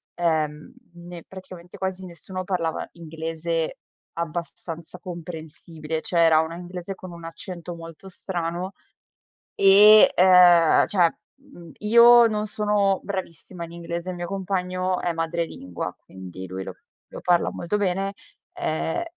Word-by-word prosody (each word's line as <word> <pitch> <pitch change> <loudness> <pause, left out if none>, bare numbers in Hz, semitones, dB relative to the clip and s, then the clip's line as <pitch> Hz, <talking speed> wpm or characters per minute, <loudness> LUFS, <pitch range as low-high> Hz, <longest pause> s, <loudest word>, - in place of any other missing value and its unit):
Ehm, 155 -3 -1 0.2
ne 175 -1 -10
praticamente 185 -2 -12
quasi 190 0 -4
nessuno 185 +2 -7
parlava 175 -4 -2
inglese 165 0 -4 0.4
abbastanza 165 0 -6
comprensibile. 160 -2 -7
Cioè, 175 - -3
era 160 -1 +5
una 160 +1 -2
inglese 180 +2 -7
con 185 -1 -10
un 170 -1 -11
accento 170 +1 -7
molto 165 +3 -11
strano 175 +1 -4 0.8
e, 205 +2 +8
ehm, 180 -3 +6
cioè, 175 -4 +2 0.2
mhmm, 275 - -15
io 235 +2 +7
non 215 -1 -2
sono 205 -2 +1
bravissima 185 -2 -6
in 165 - -13
inglese. 170 +1 -5
Il 180 - -4
mio 175 0 -5
compagno 185 -1 -2
è 175 - -1
madrelingua, 165 - -4
quindi 95 0 -9
lui 95 +1 -6
lo - - -7 0.4
lo - - -6
parla 175 -1 +2
molto 175 +4 -2
bene, 195 0 -1 0.4
ehm, 160 - -2
175 Hz, 130 wpm, -24 LUFS, 165-190 Hz, 0.8 s, e